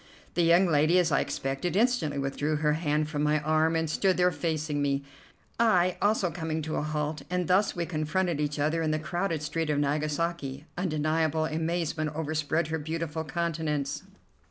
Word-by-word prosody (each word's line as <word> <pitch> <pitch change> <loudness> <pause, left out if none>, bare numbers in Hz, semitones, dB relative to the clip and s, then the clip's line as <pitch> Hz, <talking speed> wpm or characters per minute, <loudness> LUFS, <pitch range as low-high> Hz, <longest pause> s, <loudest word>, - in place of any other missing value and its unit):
The 175 - +1
young 170 +3 +5
lady, 160 +1 +3
as 175 -3 +3
I - - +3
expected, 135 +7 -2
instantly 220 - +2
withdrew 140 +2 -1
her 150 0 +2
hand 150 -1 0
from 150 -1 -3
my 150 +1 +2
arm, 155 +2 +2
and 160 0 +1
stood 185 +4 +1
there 180 0 +4
facing 155 -1 -2
me, 140 -1 0 0.6
I 185 -6 +4
also 205 -4 +2
coming 160 -2 -3
to 155 +1 -3
a - - 0
halt; 150 0 -2
and 180 -1 -1
thus 190 +3 +3
we 170 -1 -1
confronted 165 0 -1
each 150 0 -1
other 155 +3 +1
in 160 - 0
the 155 - +1
crowded 165 0 -2
street 160 +1 -2
of 150 - +1
Nagasaki. 150 0 -1
Undeniable 155 -2 0
amazement 160 -1 -2
overspread 155 0 -1
her 160 0 -1
beautiful 160 +1 -3
countenance. 155 -2 -2
155 Hz, 175 wpm, -28 LUFS, 150-170 Hz, 0.6 s, young